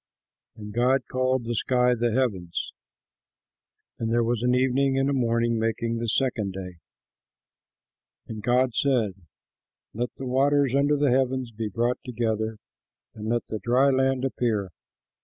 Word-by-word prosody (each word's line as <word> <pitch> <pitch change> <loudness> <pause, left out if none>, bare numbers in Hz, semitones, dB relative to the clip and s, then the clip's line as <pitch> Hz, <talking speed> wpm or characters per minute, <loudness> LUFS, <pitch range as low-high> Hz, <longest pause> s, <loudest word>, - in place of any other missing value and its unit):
And 105 -1 -9
God 125 +4 +3
called 130 0 +1
the 120 - -2
sky 125 +2 +2
the 120 0 0
Heavens. 105 -9 -1 1.3
And 115 -1 -2
there 120 0 +3
was 115 0 0
an 125 +1 +2
evening 135 +1 +2
and 135 +1 +2
a - - 0
morning, 115 -2 +1
making 115 +1 -1
the 115 - -3
second 110 -5 0
day. 90 -2 -8 1.5
And 110 -1 -6
God 125 +2 +2
said, 120 -8 +1 0.8
"Let 120 +3 -2
the 135 - -7
waters 135 +1 +2
under 140 +2 +3
the 145 -2 +2
heavens 130 -1 0
be 110 -1 -4
brought 120 +4 0
together, 110 -3 -2 0.6
and 110 -1 -6
let 120 0 0
the 110 - -5
dry 130 +5 +3
land 135 0 +1
appear." 110 -7 -1
120 Hz, 145 wpm, -25 LUFS, 110-130 Hz, 1.5 s, God